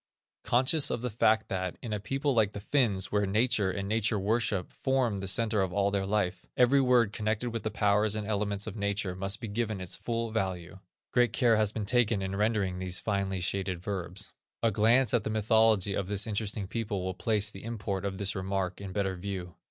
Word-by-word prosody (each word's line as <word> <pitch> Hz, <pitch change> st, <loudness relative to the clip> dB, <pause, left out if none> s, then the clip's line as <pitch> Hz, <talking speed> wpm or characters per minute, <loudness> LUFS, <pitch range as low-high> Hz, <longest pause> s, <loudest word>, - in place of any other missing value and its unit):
Conscious 130 Hz, +5 st, +3 dB
of 115 Hz, -, -2 dB
the 125 Hz, -, -2 dB
fact 110 Hz, 0 st, +2 dB
that, 95 Hz, -2 st, -3 dB
in 115 Hz, -3 st, -5 dB
a 105 Hz, -, -1 dB
people 135 Hz, +6 st, -1 dB
like 110 Hz, -4 st, +2 dB
the -, -, -5 dB
Finns 105 Hz, -4 st, 0 dB
where 105 Hz, -1 st, +1 dB
nature 105 Hz, -1 st, +2 dB
and 100 Hz, +1 st, -3 dB
nature 110 Hz, 0 st, +1 dB
worship 105 Hz, -2 st, 0 dB
form 130 Hz, -6 st, 0 dB
the 95 Hz, -, -4 dB
centre 110 Hz, +1 st, +2 dB
of 95 Hz, -2 st, -1 dB
all 100 Hz, +1 st, +1 dB
their 100 Hz, -1 st, -1 dB
life, 95 Hz, -3 st, 0 dB
every 130 Hz, +2 st, +5 dB
word 125 Hz, -5 st, +3 dB
connected 110 Hz, +2 st, -1 dB
with 115 Hz, -1 st, -3 dB
the 110 Hz, -, -2 dB
powers 105 Hz, 0 st, +2 dB
and 105 Hz, -1 st, -3 dB
elements 100 Hz, -1 st, -1 dB
of 110 Hz, -, -6 dB
nature 100 Hz, -3 st, -2 dB
must 95 Hz, +3 st, -1 dB
be 115 Hz, -, -5 dB
given 110 Hz, -1 st, -2 dB
its 90 Hz, -1 st, -2 dB
fall 115 Hz, -1 st, -3 dB
value, 95 Hz, -4 st, -3 dB, 0.3 s
great 120 Hz, -3 st, +3 dB
care 120 Hz, -3 st, +4 dB
has 105 Hz, -1 st, +2 dB
been 110 Hz, -2 st, -4 dB
taken 115 Hz, -3 st, +2 dB
in 95 Hz, 0 st, -3 dB
rendering 100 Hz, -3 st, 0 dB
these 95 Hz, -1 st, 0 dB
finely 100 Hz, -3 st, -1 dB
shaded 95 Hz, -1 st, -1 dB
verbs. 95 Hz, +1 st, -5 dB, 0.3 s
A 115 Hz, -, +3 dB
glance 115 Hz, +4 st, +3 dB
at 120 Hz, -4 st, +2 dB
the -, -, -3 dB
mythology 110 Hz, -2 st, +3 dB
of 95 Hz, -1 st, -2 dB
this 100 Hz, 0 st, 0 dB
interesting 105 Hz, -2 st, -2 dB
people 105 Hz, -2 st, -3 dB
will 95 Hz, 0 st, -2 dB
place 105 Hz, +2 st, +1 dB
the 95 Hz, -, -11 dB
import 105 Hz, -4 st, -3 dB
of 100 Hz, -1 st, -3 dB
this 100 Hz, 0 st, 0 dB
remark 95 Hz, -1 st, -2 dB
in 95 Hz, -2 st, -7 dB
better 95 Hz, -2 st, -1 dB
view. 90 Hz, -1 st, -5 dB
105 Hz, 210 wpm, -29 LUFS, 95-115 Hz, 0.3 s, every